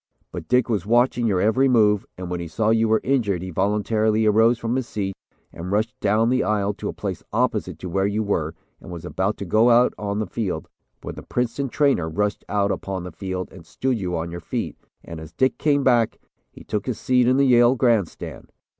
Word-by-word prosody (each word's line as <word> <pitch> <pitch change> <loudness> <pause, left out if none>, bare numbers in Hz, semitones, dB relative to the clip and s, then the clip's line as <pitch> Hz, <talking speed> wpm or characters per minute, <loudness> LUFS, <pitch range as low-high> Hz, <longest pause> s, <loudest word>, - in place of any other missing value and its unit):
But - - -7
Dick 125 0 +3
was 105 -7 -1
watching 120 +1 +3
your 95 -4 +1
every 110 +7 +3
move, 105 -5 +3
and 90 0 -6
when 90 0 -3
he 85 - -5
saw 105 +8 0
you 115 0 +3
were 110 0 +2
injured 110 -10 0
he 95 - -6
voluntarily 105 +3 +1
arose 110 +3 +4
from 115 +1 -2
his 130 -2 -2
seat 95 -2 -3 0.4
and 85 +3 -6
rushed 110 +2 0
down 110 +3 +2
the 130 - +2
aisle 105 -1 0
to - - -5
a - - -2
place - - -5
opposite - - 0
to 95 - -7
where 95 +3 0
you 105 +2 -1
were 80 -6 -1 0.2
and - - -12
was 85 -2 -7
about 95 +3 -1
to 100 - -5
go 110 +7 +4
out 120 +1 +5
on 100 -1 -2
the 110 - -1
field, 95 -6 -3 0.4
when - - -5
the - - -9
Princeton 125 +3 -2
trainer 135 - +1
rushed 105 +5 -1
out 100 -1 +1
upon 95 -2 -4
the 90 - -7
field 95 +2 -5
and 90 -2 -12
stood 125 +8 -2
you 90 -3 -2
on 85 +1 -4
your 85 - -5
feet, 80 - -4 0.3
and 80 - -8
as 80 0 -11
Dick 130 +10 +1
came 145 -2 +2
back, 120 -4 +3 0.3
he - - -14
took 105 - -3
his 125 - -2
seat 125 -1 +2
in 130 +1 +4
the 140 - +4
Yale 120 0 +5
grandstand. 115 -8 -1
105 Hz, 225 wpm, -23 LUFS, 95-120 Hz, 0.4 s, out